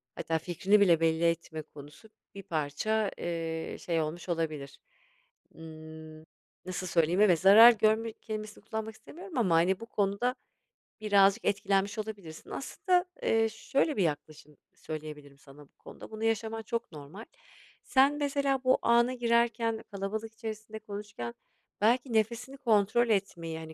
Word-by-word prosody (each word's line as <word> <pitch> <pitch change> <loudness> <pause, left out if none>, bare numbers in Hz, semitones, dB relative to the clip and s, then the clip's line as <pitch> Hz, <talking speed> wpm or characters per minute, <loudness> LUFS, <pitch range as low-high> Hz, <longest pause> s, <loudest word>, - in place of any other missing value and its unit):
hatta 165 0 -1
fikrini 185 +5 +2
bile 170 -5 +5
belli 165 0 +1
etme 165 -1 -1
konusu 150 +8 -14 0.3
bir 195 - -8
parça, 175 +8 -1
eee, 165 -1 -4
şey 165 -2 -1
olmuş 165 +4 -5
olabilir. 155 -5 -3 0.8
Imm, 155 -1 -11 0.4
nasıl 185 0 -4
söyleyeyim? 170 +3 +2
Evet, 180 -6 +5
zarar 220 +5 +9
görme 220 +1 +1
kelimesini 215 -1 -7
kullanmak 220 0 -5
istemiyorum 350 - -10
ama, 185 -8 +3
hani, 180 +4 +3
bu 230 - -8
konuda 210 +3 -1 0.7
birazcık 200 +1 +4
etkilenmiş 200 0 0
olabilirsin. 200 -7 -8
Aslında, 360 +5 0 0.2
eee, 225 0 +2
şöyle 270 +6 -1
bir 195 - +3
yaklaşım 150 -1 -5 0.2
söyleyebilirim 150 -2 -8
sana 145 0 -16
bu - - -42
konuda: - - -12
Bunu 220 0 -6
yaşaman 225 0 -1
çok 230 0 -4
normal. 155 +9 -10 0.6
Sen 275 +2 +4
mesela 280 -2 0
bu 255 0 +3
ana 235 +2 +3
girerken 235 -2 +1
kalabalık 215 +3 -4
içerisinde 220 -1 -7
konuşurken 205 - -7 0.5
belki 245 +3 +2
nefesini 235 +5 -1
kontrol 230 -1 +2
etmeyi, 170 -6 -1
hani, 160 0 -9
205 Hz, 135 wpm, -29 LUFS, 165-225 Hz, 0.8 s, zarar